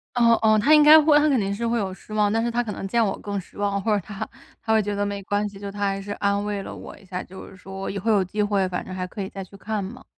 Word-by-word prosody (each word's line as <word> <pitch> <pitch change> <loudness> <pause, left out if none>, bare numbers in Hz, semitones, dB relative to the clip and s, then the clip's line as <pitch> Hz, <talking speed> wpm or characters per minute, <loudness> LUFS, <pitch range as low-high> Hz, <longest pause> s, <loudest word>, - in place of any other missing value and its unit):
哦， 235 -1 +5
哦， 215 -1 +5
他 295 +9 +5
应 300 - +7
该 305 +1 +9
会 300 -1 +4
他 300 +1 +3
肯 275 -3 +3
定 200 -2 -1
是 235 +3 -3
会 235 +1 +1
有 195 -3 -2
失 215 - -15
望， 210 -1 +2
但 225 +1 +1
是 235 - 0
他 240 +1 0
可 215 -3 -5
能 195 - -5
见 230 +3 +2
我 195 - -1
更 200 -1 -3
失 180 - -18
望， 200 -1 -1
或 215 +2 +1
者 205 - +1
他 205 -2 -6 0.3
他 220 -1 0
会 220 - +4
觉 205 0 -3
得 205 0 -1
没 200 -1 -4
关 205 +1 0
系， 200 - -12
就 200 - -5
他 205 +1 -9
还 195 -1 0
是 205 - -9
安 200 0 0
慰 205 -1 -3
了 - - -8
我 - - -10
一 200 - -19
下， 185 -1 -5
就 190 +1 -11
是 - - -14
说 195 +1 -7
以 200 - -4
后 225 +4 -1
有 200 -3 +3
机 210 +4 -2
会 200 -2 +1
反 180 -1 -4
正 185 - -7
还 185 -1 -3
可 195 +2 -6
以 190 - -4
再 195 -1 -7
去 200 - -15
看 215 +1 -3
嘛。 245 +7 -9
205 Hz, 360 characters per minute, -24 LUFS, 195-220 Hz, 0.3 s, 该